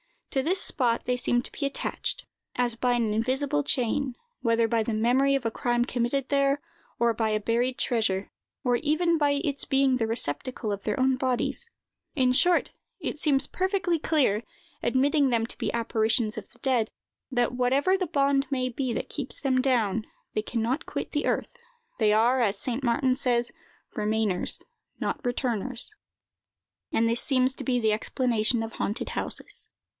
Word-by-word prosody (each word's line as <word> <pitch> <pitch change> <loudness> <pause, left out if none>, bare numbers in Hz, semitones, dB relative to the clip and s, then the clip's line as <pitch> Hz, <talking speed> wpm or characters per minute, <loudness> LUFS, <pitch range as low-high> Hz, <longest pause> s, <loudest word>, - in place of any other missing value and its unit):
To 270 - +2
this 360 +7 +1
spot 240 -4 +2
they 250 0 0
seem 245 -1 +1
to - - -8
be 285 - -3
attached, 275 - -2 0.3
as 245 -2 0
by 245 +1 +1
an 230 -3 +1
invisible 270 +6 0
chain, 260 -1 0 0.3
whether 230 -1 +2
by 230 0 +1
the 220 +1 -2
memory 255 +5 +3
of 270 -3 -2
a 225 - +1
crime 240 +1 +1
committed 250 +2 -1
there, 275 0 +2 0.4
or 235 0 +3
by 220 -1 0
a 215 - +1
buried 235 +4 0
treasure, 210 -5 0 0.3
or 245 -1 +2
even 325 +4 +2
by 290 -1 +3
its 280 -4 -2
being 270 -1 +3
the 225 -2 0
receptacle 225 - -2
of 200 -1 -4
their 210 +2 -1
own 260 0 +3
bodies. 260 - -1 0.5
In 255 -3 +3
short, 350 +7 +3 0.3
it 305 - -4
seems 285 -3 +2
perfectly 370 -3 0
clear, 270 -9 +2 0.4
admitting 275 +3 +3
them 230 -2 +1
to - - -4
be - - -1
apparitions 225 -1 +1
of 210 - -7
the - - -22
dead, 245 -5 +1 0.4
that, 245 -3 +1
whatever 260 +8 +2
the 370 -2 -2
bond 280 -2 +2
may 255 -2 0
be 255 0 -2
that - - -3
keeps 280 -4 -5
them 260 -2 +2
down, 225 -5 +1 0.3
they 215 - 0
can 230 +1 -3
not 255 +6 -1
quit - - -4
the 295 - -1
earth; - - -1 0.4
they 210 -2 +4
are, 235 +4 +4
as 205 -3 +1
St. 250 +5 -3
Martin 255 +1 +2
says, 240 -2 +1 0.4
remainers, 210 -3 0 0.4
not - - -2
returners, 245 - -1 1.0
and 230 - +3
this 230 +1 +2
seems 260 -1 +3
to - - -6
be 250 -2 +2
the 220 -2 +2
explanation 230 0 0
of 225 - -6
haunted 210 - -2
houses. - - -2
250 Hz, 175 wpm, -27 LUFS, 230-275 Hz, 1.0 s, they